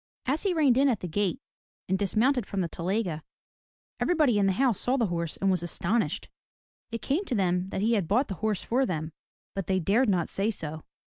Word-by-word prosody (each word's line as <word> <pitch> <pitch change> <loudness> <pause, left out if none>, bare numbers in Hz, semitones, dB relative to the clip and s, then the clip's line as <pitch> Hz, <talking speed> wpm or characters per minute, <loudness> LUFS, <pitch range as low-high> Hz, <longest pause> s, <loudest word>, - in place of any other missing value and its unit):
As 285 +4 0
he 390 -3 +1
reined 275 -6 +4
in 280 0 +5
at 230 -6 0
the 180 - -3
gate, 205 +7 -1 0.5
and 190 - +1
dismounted 225 +4 +2
from 195 - -2
the 175 - 0
telyega, 175 -1 -2 0.8
everybody 300 -11 +3
in 195 - +3
the 190 - +2
house 245 0 +2
saw 255 +2 +1
the 235 - +2
horse 170 -3 -2
and 195 0 +2
was 180 -3 +1
astonished. 175 +2 -1 0.6
It 230 -1 -5
came 300 +9 0
to 255 - -2
them 180 -2 +1
that 195 - -3
he 225 +3 +2
had 200 -7 +1
bought 245 - +2
the - - -4
horse 215 -3 0
for 255 +3 +1
them, 160 - -3 0.4
but 195 -4 -4
they 190 -1 +2
dared 210 +8 +2
not 180 -4 +1
say 200 +3 +1
so. 160 -7 -5
205 Hz, 215 wpm, -28 LUFS, 180-245 Hz, 0.8 s, in